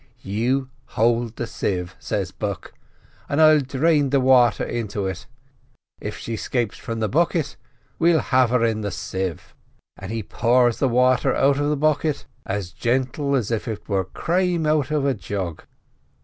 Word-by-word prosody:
"'You 125 +7 -1 0.3
hold 115 0 +2
the 120 - -3
sieve,' 90 -5 -3
says - - -3
Buck, - - -5 0.6
'and 140 - 0
I'll 155 -1 +7
drain 145 +2 +1
the 140 +1 +3
water 125 -3 +4
into 105 -4 -3
it; 95 -1 -5 0.7
if - - -5
she 115 - -5
'scapes 115 +1 -2
from 115 -1 -5
the 110 - +1
bucket 155 - 0 0.4
we'll 170 0 +4
have 130 -2 +2
her 120 -1 +2
in 110 -1 0
the 105 - -2
sieve.' 95 -1 -4 0.4
And 95 +2 -7
he 115 -1 -3
pours 120 +4 +2
the 135 - +2
wather 125 +1 +3
out 140 +1 +3
of 145 0 +1
the 150 - 0
bucket 150 0 0 0.2
as 95 -2 -3
gentle 130 - 0
as 120 -4 -1
if 115 +1 -2
it 110 -3 -5
was 95 -3 0
crame 175 -1 0
out 150 -2 +2
of 150 -2 0
a 140 - +2
jug. 95 -6 -5
125 Hz, 165 wpm, -23 LUFS, 105-140 Hz, 0.7 s, I'll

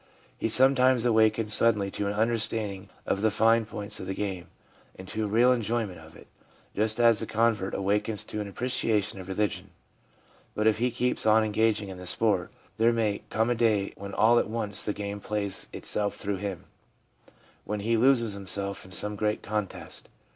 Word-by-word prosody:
He - - -2
sometimes 130 0 +4
awakens 110 -2 +3
suddenly 105 -4 +3
to 100 - -3
an 100 - -1
understanding 110 -3 -1 0.2
of 100 - -1
the 110 - +3
fine 115 +1 +3
points 105 -2 -3
of 95 - -7
the 95 - -3
game, 95 -4 -4 0.5
and 95 - -10
to 110 0 -2
a - - -2
real 115 +5 +4
enjoyment 115 -6 -1
of 80 0 -15
it, - - -15 0.5
just 110 +2 0
as 115 -2 +5
the 110 - -3
convert 110 -3 0
awakens 105 +2 -1
to 105 - -5
an 105 - -5
appreciation 105 -2 -1
of 95 - -9
religion. 100 -1 -2 0.9
But 105 - -1
if 110 -1 +3
he 125 +2 +1
keeps 125 -1 -1
on 110 +1 +5
engaging 110 -1 0
in 95 -1 -8
the 90 - -6
sport, 100 -5 +2 0.3
there 115 +1 +4
may 110 -3 -1
come 110 +2 0
a - - +4
day 110 -4 +1
when 100 0 -8
all 120 +2 +4
at - - -2
once 110 -3 +1
the 105 - 0
game 100 0 -5
plays 100 -1 -3
itself 105 -1 -1
through 100 -1 -3
him 95 -2 -5 0.5
— - - -30
when 105 -1 -3
he 115 +3 +1
loses 115 -2 +3
himself 100 0 -1
in 95 - -15
some 105 +2 +1
great 105 +1 -2
contest. 105 -1 -5
105 Hz, 190 wpm, -27 LUFS, 100-115 Hz, 0.9 s, as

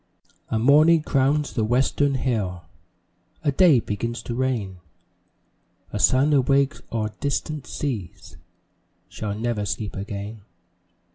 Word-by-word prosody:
A 110 - 0
morning 150 +7 +5
crowns 145 +1 +1
the 110 - 0
Western 135 +4 +1
hill, 105 -9 -2 0.8
A 145 - +2
day 155 -2 +5
begins 115 +2 -4
to 120 - -5
reign, 115 -7 -2 1.2
A - - -2
sun 140 +4 +4
awakes 140 +1 +2
o'er 110 -2 -1
distant 145 +1 -3
seas 115 - -5 0.7
Shall 105 -1 -5
never 115 -2 -1
sleep 105 +1 -4
again. 100 +2 -6
125 Hz, 115 wpm, -23 LUFS, 105-140 Hz, 1.2 s, morning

